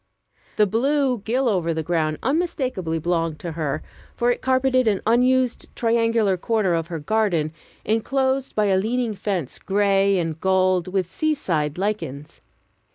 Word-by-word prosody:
The 210 - +4
blue 260 +4 +1
gill 245 +6 0
over 175 -6 0
the 160 - -2
ground 155 -2 0
unmistakably 260 - -1
belonged 165 -1 -1
to 170 - -4
her, 155 -2 -3 0.3
for 240 +1 +2
it - - -3
carpeted 260 -1 +2
an 205 -3 +1
unused 250 +2 +2
triangular 230 -4 +2
corner 210 -1 0
of 165 -1 -1
her 170 -2 -4
garden 170 -2 0 0.3
inclosed 265 +4 0
by 215 - +2
a 195 -2 +3
leaning 230 +3 0
fence 190 -8 -3
gray 195 0 +2
and 165 -2 -2
gold 185 -1 +2
with 185 -1 -2
sea 310 0 0
side 155 - -2
lichens. 180 -8 -4
200 Hz, 150 wpm, -23 LUFS, 170-245 Hz, 0.3 s, The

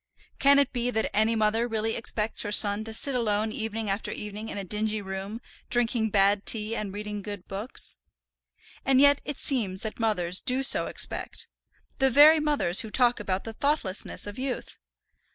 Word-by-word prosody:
Can 280 0 +5
it 280 -2 +2
be 245 -1 -1
that 220 -2 -2
any 220 +2 +3
mother 220 +2 +1
really 225 -1 -2
expects 220 -1 -1
her 205 - -3
son 205 0 +6
to 225 - -6
sit 270 +5 +2
alone 220 -3 -1
evening 220 0 -4
after 200 +2 -2
evening 210 +1 -7
in - - -6
a 200 - -3
dingy 215 +3 -2
room 195 +3 -7 0.3
drinking 235 -2 +1
bad 200 0 +2
tea, 220 0 +1
and 210 -3 -4
reading 210 +1 -6
good 205 -2 -8
books? 200 +6 -6 0.9
And 265 -1 +3
yet 285 0 +5
it 290 - -5
seems 210 -9 -1
that 220 +1 -6
mothers 185 -5 -1
do 260 +1 +2
so - - +6
expect, - - -2 0.5
the 265 0 +3
very 300 +5 +7
mothers 290 - +1
who 220 - -7
talk 245 +2 +2
about 195 -2 -3
the 225 - -8
thoughtlessness 255 -7 -2
of 205 +3 -8
youth! 260 -1 -5
220 Hz, 180 wpm, -26 LUFS, 205-245 Hz, 0.9 s, very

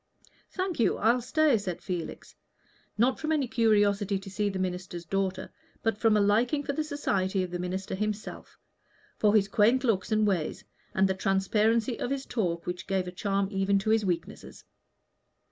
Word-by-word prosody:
"Thank 370 -4 -3
you, 230 - +2
I'll 235 +3 +3
stay," 285 0 +2
said 185 -4 -4
Felix, 180 -4 -6 0.6
not 245 +4 +2
from 310 - -2
any 290 -4 +1
curiosity 205 -4 +2
to 195 0 -9
see 205 +1 0
the 195 - -4
minister's 180 -2 -4
daughter, 190 +1 -2 0.3
but 225 -2 +1
from 220 -1 +4
a - - +3
liking 230 +8 +2
for 280 - -2
the 310 - -1
society 195 -11 -1
of 180 - -6
the 175 - -3
minister 185 +2 -4
himself 215 +2 -4 0.6
for 210 0 +4
his 200 -2 +4
quaint 225 +6 +3
looks 220 -3 0
and 215 0 +3
ways, 185 -7 -1 0.3
and 190 +1 +4
the 190 - +1
transparency 215 +5 +1
of - - -2
his 275 0 -3
talk, 175 -7 -2
which 180 0 -5
gave 190 -2 0
a - - -4
charm 195 +1 -1
even 195 0 +2
to 215 +3 0
his 220 -1 +3
weakness. 175 -4 -4
205 Hz, 180 wpm, -28 LUFS, 190-230 Hz, 0.6 s, from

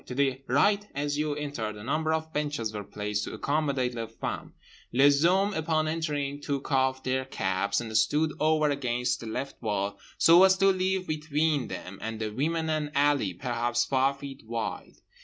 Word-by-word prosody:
To 125 - -6
the 135 -1 +1
right 200 - +3
as 145 +1 -1
you 150 -1 0
entered 140 -8 -4
a 105 - -9
number 155 +6 0
of 160 0 -2
benches 145 -7 -2
were 105 -1 -4
placed 105 0 -3
to - - -6
accommodate 140 -4 0
les 115 -1 -4
femmes. 115 - -5 0.4
Les 140 +3 +5
hommes 195 +4 +3
upon 155 0 0
entering 145 -3 -2
took 140 -1 -3
off 130 -1 +2
their 130 0 0
caps 95 -5 -1
and 110 -2 -5
stood 155 +7 +3
over 155 -1 +3
against 125 -3 -1
the 115 - -8
left 130 +5 -5
wall 100 -2 -2 0.2
so 170 +2 +7
as 190 0 +6
to 195 0 +5
leave 190 0 0
between 150 -3 0
them 95 +1 -7
and 110 0 -4
the 110 -1 -2
women 160 +7 -1
an 155 -2 -1
alley 140 -8 +3
perhaps 120 +3 0
five 135 +1 +2
feet 140 -1 -8
wide. 115 -1 -4
140 Hz, 180 wpm, -28 LUFS, 120-155 Hz, 0.4 s, so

